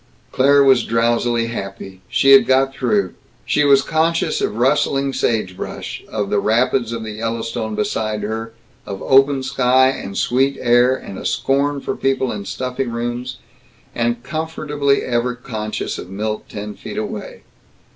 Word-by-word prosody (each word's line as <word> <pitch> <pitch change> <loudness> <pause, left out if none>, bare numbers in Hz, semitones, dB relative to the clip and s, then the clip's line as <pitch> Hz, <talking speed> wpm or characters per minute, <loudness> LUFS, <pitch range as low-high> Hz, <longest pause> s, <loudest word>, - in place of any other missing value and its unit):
Claire 140 +2 +5
was 130 -3 +5
drowsily 115 +1 +1
happy. 100 -4 -7
She 120 +3 +4
had 135 - +8
got 135 +1 +3
through. 105 -9 0 0.3
She 150 - +2
was 140 -1 +5
conscious 165 +1 0
of - - -1
rustling 135 +1 +1
sagebrush, 105 -8 -3
of 105 -2 -2
the 105 - +2
rapids 120 +2 +1
of 115 -1 -4
the 110 - -5
Yellowstone 115 0 -3
beside 105 0 -2
her, 110 +2 -4 0.4
of 100 -1 -5
open 135 0 +4
sky 130 -1 +3
and 100 -7 -5
sweet 135 +3 +1
air 120 +1 +4
and 100 -6 -8
a - - -8
scorn 140 +1 0
for - - -3
people 130 -1 0
in 100 -2 -5
stuffy 130 +4 -3
rooms, 120 +2 -4 0.6
and 120 0 -1
comfortably 150 -1 -1
ever 120 0 -1
conscious 110 -4 -4
of 90 - -8
Milt, 105 +2 -4
ten 105 0 -6
feet - - -9
away. - - -5
120 Hz, 150 wpm, -19 LUFS, 110-135 Hz, 0.6 s, had